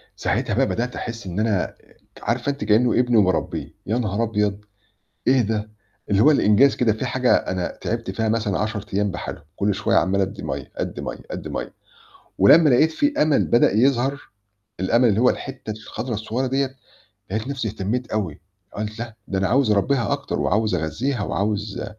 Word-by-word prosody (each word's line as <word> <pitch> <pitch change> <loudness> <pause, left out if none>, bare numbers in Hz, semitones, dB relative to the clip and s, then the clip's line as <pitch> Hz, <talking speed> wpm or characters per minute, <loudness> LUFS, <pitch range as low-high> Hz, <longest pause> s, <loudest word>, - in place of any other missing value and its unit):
ساعتها - - -1
بقى - - +3
بدأت 125 +2 -2
أحس 115 -3 -6
إن 90 +2 -3
أنا 105 -4 +2
آآ - - -8 0.4
ك - - -16
عارفة 120 +3 0
أنتِ 140 - -6
كإنه 110 +3 +3
ابني 125 -1 +3
وباربيه، 95 -4 +1
يا 110 +4 0
نهار 110 -1 -1
أبيض! 105 -2 -1 0.6
إيه 130 0 +5
ده؟ 110 0 -2 0.4
اللي 100 0 +3
هو 150 - +7
الإنجاز 135 0 +4
كده 120 -3 +3
في 110 +5 -3
حاجة 125 0 +2
أنا 90 -1 -3
تعبت - - -3
فيها 110 +3 -1
مثلًا 110 -4 0
10 105 -1 -2
أيام 100 +1 +1
بحالهم، 90 - -6
كُل 100 0 +1
شوية - - +1
عمّال 100 +1 +2
أدي 95 +1 -2
مَيَّة، - - -5
أدي - - -4
مَيَّة، - - -5
أدي - - -5
مَيَّة - - -5 0.7
ولمّا 150 - +7
لقيت 155 +5 +4
في 290 - +1
أمل 150 -2 +3
بدأ 120 - +4
يظهر، 135 +4 +1 0.5
الأمل 115 +6 +3
اللي 105 0 +2
هو 125 - +5
الحِتة 135 -5 -6
الخضرة 110 +3 -5
الصغيرة 110 +5 -2
دِيّة، 135 +1 -1 0.5
لقيت 110 +5 -2
نفسي 135 -5 -2
اهتميت 110 +5 -3
أوي 100 -8 -2 0.4
قُلت 105 +1 -4
لأ 115 -1 -6
ده 95 - -1
أنا 95 0 +1
عاوز 130 -1 +3
أربيها 115 +6 +2
أكتر 140 0 -2
وعاوز 110 0 +1
أغذيها 105 - -1
وعاوز 105 +1 -2
110 Hz, 185 wpm, -22 LUFS, 105-125 Hz, 0.7 s, هو